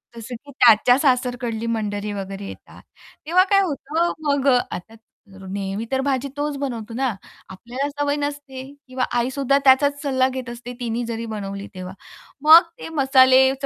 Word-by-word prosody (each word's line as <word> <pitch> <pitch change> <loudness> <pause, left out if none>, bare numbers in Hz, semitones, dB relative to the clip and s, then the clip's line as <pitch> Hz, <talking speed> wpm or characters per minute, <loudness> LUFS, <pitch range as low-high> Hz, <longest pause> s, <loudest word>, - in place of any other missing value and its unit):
जसं 235 +2 -7
की 285 - -12
त्याच्या 245 -1 +5
सासरकडली 245 -4 0
मंडळी 210 -2 -2
वगैरे 195 0 -6
येतात - - -12 0.4
तेव्हा, 355 +4 +4
काय 395 +1 +3
होतं, 325 0 -1
मग 280 -1 +1
अ, 250 -2 +5 0.2
आता 220 +5 -10 0.5
नेहमी 195 +2 -4
तर 265 0 +1
भाजी 270 -1 -1
तोच 290 0 -2
बनवतो 235 -5 -5
ना, 260 +3 0 0.4
आपल्याला 245 +9 -5
सवय 290 0 -1
नसते. 285 -2 -5 0.3
किंवा 255 0 -2
आईसुद्धा 265 +2 +1
त्याचाच 285 +2 +4
सल्ला 260 -2 +2
घेत 255 -1 -6
असते 240 +1 -8
तिनी 240 0 -2
जरी 230 0 -4
बनवली 200 -1 -6
तेव्हा. 185 0 -7 0.5
मग 320 +3 +9 0.2
ते - - -7
मसालेच 265 0 +5
260 Hz, 155 wpm, -22 LUFS, 230-280 Hz, 0.5 s, मग